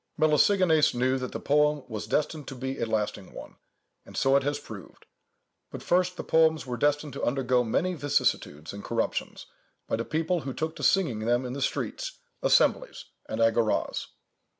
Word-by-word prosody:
Melesigenes 160 0 +4
knew 130 +2 +1
that 125 - -5
the - - -5
poem 150 0 +2
was 110 -4 -6
destined 150 0 -1
to 135 - -6
be 130 +2 -4
a 115 - -1
lasting 105 -3 -3
one, - - -10 0.5
and - - -11
so 135 0 +3
it 140 - +5
has 145 +1 -1
proved; 100 -6 -11 0.6
but, - - -8
first, 180 0 +1
the - - -4
poems 160 -1 +3
were 125 -1 -4
destined 145 +2 0
to 140 - -6
undergo 125 -1 +1
many 170 +11 0
vicissitudes 120 - -1
and 100 0 -8
corruptions, 115 -1 -3 0.4
by - - -1
the 115 - -2
people 160 +6 -1
who 135 -2 -6
took 160 0 -3
to - - -8
singing 165 - +2
them 120 +3 0
in 125 - -4
the 140 - -5
streets, - - -3 0.2
assemblies, - - +2 0.2
and 110 - -3
agoras. 115 -1 +1
135 Hz, 175 wpm, -27 LUFS, 120-155 Hz, 0.6 s, it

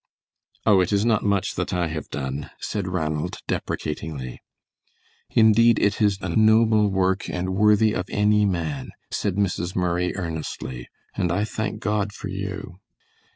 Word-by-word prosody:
"Oh, 100 -4 +6
it 90 - 0
is 100 +1 +2
not 115 -3 +3
much 100 -1 +1
that - - -2
I 90 -1 +1
have 80 -2 -5
done," 70 +1 -4
said 100 -3 -3
Ranald, 80 -4 -2
deprecatingly. 75 -4 -4 0.9
"Indeed, 115 +1 +5
it 100 +1 +1
is 100 -2 +3
a - - -3
noble 110 -1 +4
work 95 0 0
and 90 +1 -2
worthy 105 +2 +4
of 90 - -3
any 105 0 +3
man," 80 -8 -2 0.2
said 100 -3 -1
Mrs. 95 -2 -1
Murray, 90 0 0
earnestly, 80 -8 -5 0.3
"and 90 - 0
I 100 +4 +1
thank 110 0 -4
God 105 -1 -1
for 100 - -7
you." 95 -1 -5
95 Hz, 150 wpm, -24 LUFS, 85-105 Hz, 0.9 s, Oh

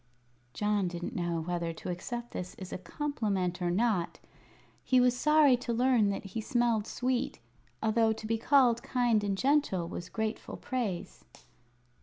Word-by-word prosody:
John 210 -2 +1
didn't 175 0 -5
know 170 -2 -1
whether 170 0 -2
to 165 - -5
accept 240 +7 -5
this 180 0 -6
as 185 -1 -8
a - - -4
compliment 195 - -2
or 175 - +1
not. 190 -2 +1 0.7
He 255 - +4
was 250 0 +4
sorry 300 0 +5
to 240 -1 -3
learn 240 -3 +3
that 200 - -3
he 210 +4 -4
smelled 235 -3 +1
sweet, 250 0 -1 0.4
although 220 0 +3
to 220 0 -5
be 225 +1 0
called 245 -2 +4
kind 240 -4 +1
and 200 -1 -1
gentle 265 - +2
was 175 0 -6
grateful 220 -1 -3
praise. 230 -9 -4
220 Hz, 155 wpm, -30 LUFS, 185-245 Hz, 0.7 s, sorry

